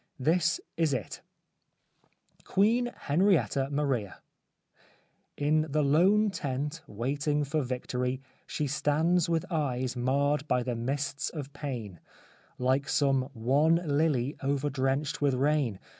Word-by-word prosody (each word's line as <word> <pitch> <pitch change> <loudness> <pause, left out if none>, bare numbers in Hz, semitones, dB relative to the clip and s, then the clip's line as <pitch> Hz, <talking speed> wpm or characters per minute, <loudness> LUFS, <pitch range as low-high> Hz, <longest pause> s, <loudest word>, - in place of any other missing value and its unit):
This 165 +5 +2 0.2
is 160 -5 +2
it: 115 - -5 0.6
— - - -36
QUEEN 230 +5 +2
HENRIETTA 145 - +1
MARIA 135 -9 -1 1.2
In 155 +2 +2
the 150 +1 +1
lone 190 +9 +4
tent, 145 0 -3
waiting 145 +7 -1
for 150 +2 -1
victory, 125 0 -2 0.3
She 150 - -2
stands 150 +4 +1
with 165 -2 0
eyes 130 -6 -1
marred 140 +4 +1
by 125 -2 +1
the 120 -1 -2
mists 140 +4 -2
of 145 -3 -7
pain, 120 - -6 0.6
Like 130 +2 +1
some 135 -2 +2
wan 140 +8 +3
lily 145 -5 +1
overdrenched 140 +1 -1
with 140 -2 +2
rain. 140 -5 +1
145 Hz, 115 wpm, -29 LUFS, 130-155 Hz, 1.2 s, lone